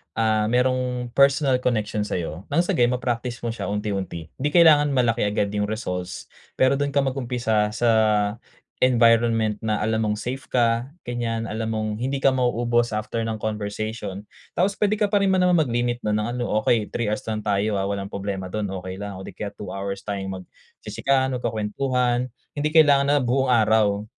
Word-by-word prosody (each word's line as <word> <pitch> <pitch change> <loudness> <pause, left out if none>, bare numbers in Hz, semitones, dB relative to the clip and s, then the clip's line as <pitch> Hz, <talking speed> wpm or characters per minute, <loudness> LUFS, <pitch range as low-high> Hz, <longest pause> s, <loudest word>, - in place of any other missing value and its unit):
ah, 110 -1 +2
merong 125 0 0
personal 140 -1 +4
connection 110 -3 0
sa'yo, 85 +1 -4
ng - - +2
sagayon 125 -10 +2
ma-practice 120 0 -3
mo - - -1
siya 115 - -4
unti-unti. 100 -5 -3
'Di 145 +2 -2
kailangan 150 -4 +6
malaki 120 -4 +1
agad 105 0 0
'yung 105 - 0
results, 90 -5 -4 0.3
pero 130 +1 +4
do'n 140 0 0
ka 140 - +2
mag-umpisa 120 -5 0
sa 120 -1 +2 0.9
environment 115 -3 +3
na 110 -1 0
alam 110 0 0
mong 105 0 -1
safe 130 +4 -6
ka 120 +2 +1 0.2
ganiyan, 115 -2 -2
alam 110 +1 -3
mong 110 -1 -2
hindi 135 +4 -2
ka 135 - +3
ma-uubos 120 -1 +1
after 110 +2 -2
ng 110 -1 -3
conversation. 105 -1 -4 0.2
Tapos 195 +3 0
puwede 210 +1 0
ka 210 - +3
pa 200 -1 +2
rin 190 - +3
naman 180 -1 +3
mag-limit 120 -5 0
na 105 - 0
ng 105 +1 0
ano, 125 - -2 0.2
okey 110 -3 +1
3 120 -3 -2
hours 105 - -2
lang 110 -1 -2
tayo 105 0 0
ah, 95 - -1
walang 100 -1 -3
problema 95 -1 -4
do'n 105 -1 -2 0.2
okey 95 0 -6
lang 100 -1 -6
o - - -8
di - - -8
kaya 105 - -4
2 105 - -8
hours 100 0 -4
tayong 100 -2 -4
mag-chichikahan, 135 +6 -2
o - - -3
magkukuwentuhan. 120 +3 0 0.3
Hindi 145 +1 0
kailangan 145 -3 +5
na 145 0 +4
buong 130 +2 +1
araw, 110 -3 +3
115 Hz, 180 wpm, -23 LUFS, 105-130 Hz, 0.9 s, kailangan